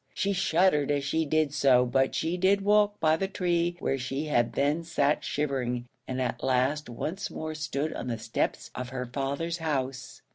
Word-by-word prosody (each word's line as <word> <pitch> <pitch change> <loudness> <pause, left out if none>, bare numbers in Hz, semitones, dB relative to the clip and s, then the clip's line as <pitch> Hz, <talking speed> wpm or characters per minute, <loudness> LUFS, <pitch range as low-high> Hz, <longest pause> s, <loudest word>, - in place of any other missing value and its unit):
She 200 0 0
shuddered 175 -5 +2
as 145 -1 +1
she 160 +4 0
did 155 -1 +1
so, 125 -4 +4
but 135 +2 +1
she 165 +2 0
did 190 +2 +3
walk 205 0 +3
by 155 0 +3
the 195 - -1
tree 175 -2 0
where 135 -5 -1
she 135 +4 -3
had 120 -6 +1
then 145 +6 +1
sat 150 -3 +1
shivering, 125 -4 -2 0.2
and 130 0 -3
at 125 -2 -2
last 130 +3 +1
once 160 +10 -4
more 155 0 -5
stood 150 0 -2
on - - -5
the 120 -2 -2
steps 110 - -2
of 125 0 -5
her 125 -1 -4
father's 140 +7 -3
house. 135 -4 -3
145 Hz, 185 wpm, -28 LUFS, 130-165 Hz, 0.2 s, so